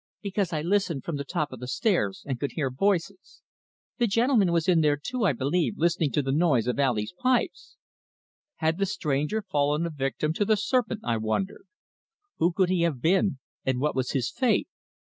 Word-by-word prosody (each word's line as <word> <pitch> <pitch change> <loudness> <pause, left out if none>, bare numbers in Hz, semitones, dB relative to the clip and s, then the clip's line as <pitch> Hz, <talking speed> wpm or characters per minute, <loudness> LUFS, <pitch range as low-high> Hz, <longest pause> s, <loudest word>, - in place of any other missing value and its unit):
"Because 200 -2 -1
I 155 -2 -2
listened 180 -6 0
from 165 -4 -3
the 140 - -3
top 150 0 -2
of 130 - -8
the 125 - -6
stairs, 175 - 0
and 130 -3 -3
could 140 -2 -3
hear 135 -5 -1
voices. 195 - -1 0.6
The 240 - +3
gentleman 230 -3 +3
was 165 -2 +1
in 175 -3 +4
there 150 -1 +3
too, 245 - -2
I 175 - +3
believe, 145 +8 0
listening 165 -2 +1
to 145 - +1
the 135 - -1
noise 145 -6 +2
of 125 +2 -1
Ali's 120 -3 0
pipes." 255 - 0 0.8
Had 160 +2 0
the 195 - +1
stranger 150 +2 -1
fallen 150 +1 0
a 170 - -3
victim 145 +2 -1
to 205 - 0
the 215 +1 +2
serpent, 225 0 0
I 115 -1 0
wondered? 110 - -2 0.7
Who 170 - +3
could 185 +1 +1
he 185 -2 +1
have 165 -6 0
been, 180 - +2 0.3
and 130 -1 0
what 150 +3 0
was 130 -1 -1
his 130 -4 -1
fate? 245 -6 +1
165 Hz, 195 wpm, -27 LUFS, 135-195 Hz, 0.8 s, in